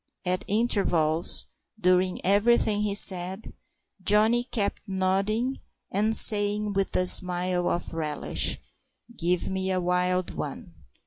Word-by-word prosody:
At 180 Hz, 0 st, -2 dB
intervals, 180 Hz, -7 st, +1 dB, 0.3 s
during 185 Hz, -1 st, 0 dB
everything 210 Hz, +1 st, +2 dB
he 205 Hz, -1 st, -1 dB
said, 190 Hz, +1 st, +2 dB, 0.5 s
Johnny 220 Hz, +5 st, +2 dB
kept 215 Hz, -5 st, -3 dB
nodding 200 Hz, +7 st, -2 dB, 0.3 s
and 215 Hz, +3 st, 0 dB
saying, 205 Hz, 0 st, +4 dB
with 195 Hz, 0 st, -2 dB
a 185 Hz, -, +1 dB
smile 180 Hz, 0 st, +2 dB
of 175 Hz, 0 st, -4 dB
relish: 155 Hz, -2 st, -2 dB, 0.6 s
"Give 175 Hz, -1 st, -1 dB
me 190 Hz, 0 st, -3 dB
a 185 Hz, -1 st, -1 dB
wild 180 Hz, 0 st, -2 dB
one!" 140 Hz, -, -8 dB
190 Hz, 115 wpm, -25 LUFS, 180-210 Hz, 0.6 s, saying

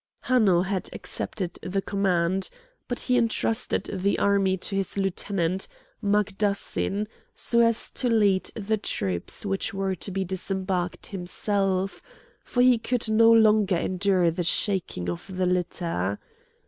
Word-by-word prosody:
Hanno 205 Hz, -9 st, +3 dB
had 190 Hz, -1 st, -2 dB
accepted 180 Hz, -4 st, -4 dB
the 185 Hz, +2 st, -2 dB
command; 190 Hz, -2 st, 0 dB, 0.4 s
but 245 Hz, -, -3 dB
he 250 Hz, -1 st, +3 dB
intrusted 230 Hz, 0 st, 0 dB
the 195 Hz, +1 st, +1 dB
army 195 Hz, -2 st, +2 dB
to 195 Hz, +2 st, -3 dB
his 195 Hz, 0 st, -1 dB
lieutenant, 190 Hz, -1 st, -1 dB, 0.4 s
Magdassin, 205 Hz, 0 st, 0 dB, 0.3 s
so 235 Hz, -, +1 dB
as 230 Hz, -1 st, +2 dB
to 250 Hz, -, -1 dB
lead 205 Hz, -4 st, +3 dB
the 220 Hz, 0 st, -1 dB
troops 95 Hz, -, -3 dB
which 195 Hz, +2 st, -1 dB
were 195 Hz, -1 st, 0 dB
to 185 Hz, -, -5 dB
be 190 Hz, 0 st, -2 dB
disembarked 185 Hz, -1 st, -2 dB
himself, 195 Hz, 0 st, -1 dB, 0.4 s
for 245 Hz, -, +1 dB
he 250 Hz, -2 st, +5 dB
could 240 Hz, -1 st, -1 dB
no 225 Hz, +1 st, +6 dB
longer 215 Hz, -4 st, +5 dB
endure 185 Hz, -1 st, +2 dB
the 175 Hz, +2 st, -3 dB
shaking 175 Hz, -, 0 dB
of 85 Hz, -, -5 dB
the 185 Hz, -, +1 dB
litter. 170 Hz, -, -1 dB
195 Hz, 135 wpm, -26 LUFS, 180-210 Hz, 0.4 s, no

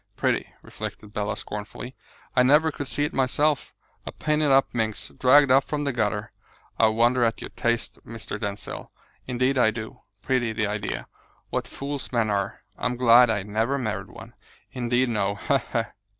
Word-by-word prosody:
Pretty!" -, -, 0 dB
reflected 105 Hz, -1 st, -8 dB
Bella 105 Hz, -1 st, -2 dB
scornfully, 105 Hz, +5 st, -7 dB, 0.4 s
"I 125 Hz, -, +6 dB
never 150 Hz, +5 st, +5 dB
could 145 Hz, -1 st, -5 dB
see 145 Hz, -, 0 dB
it -, -, -4 dB
myself; 145 Hz, +3 st, +1 dB, 0.3 s
a -, -, -6 dB
painted 150 Hz, -1 st, +1 dB
up 135 Hz, 0 st, +4 dB
minx, 110 Hz, -3 st, -2 dB
dragged 140 Hz, +1 st, +5 dB
up 135 Hz, +1 st, +6 dB
from 145 Hz, +1 st, -3 dB
the 140 Hz, -, 0 dB
gutter. 105 Hz, -1 st, -1 dB, 0.5 s
I 110 Hz, -, +6 dB
wonder 120 Hz, +3 st, +3 dB
at 115 Hz, -1 st, +1 dB
your -, -, -7 dB
taste, 120 Hz, -1 st, -1 dB
Mr. 110 Hz, -2 st, -6 dB
Denzil, 100 Hz, 0 st, -5 dB, 0.4 s
indeed 130 Hz, +2 st, +1 dB
I 115 Hz, -, +5 dB
do. 110 Hz, 0 st, -7 dB, 0.2 s
Pretty, 125 Hz, -4 st, +1 dB
the 105 Hz, -1 st, 0 dB
idea! 105 Hz, 0 st, -3 dB, 0.5 s
What -, -, -2 dB
fools 140 Hz, 0 st, -5 dB
men 115 Hz, -4 st, +1 dB
are! 100 Hz, -1 st, -2 dB, 0.2 s
I'm 125 Hz, -, -1 dB
glad 120 Hz, 0 st, +7 dB
I 105 Hz, -3 st, +1 dB
never 110 Hz, +7 st, 0 dB
married 115 Hz, -6 st, -3 dB
one! -, -, -12 dB, 0.4 s
Indeed 125 Hz, 0 st, +1 dB
no! 100 Hz, -3 st, 0 dB
He! 140 Hz, +6 st, +1 dB
he!" 115 Hz, -, +2 dB
120 Hz, 170 wpm, -25 LUFS, 110-135 Hz, 0.5 s, glad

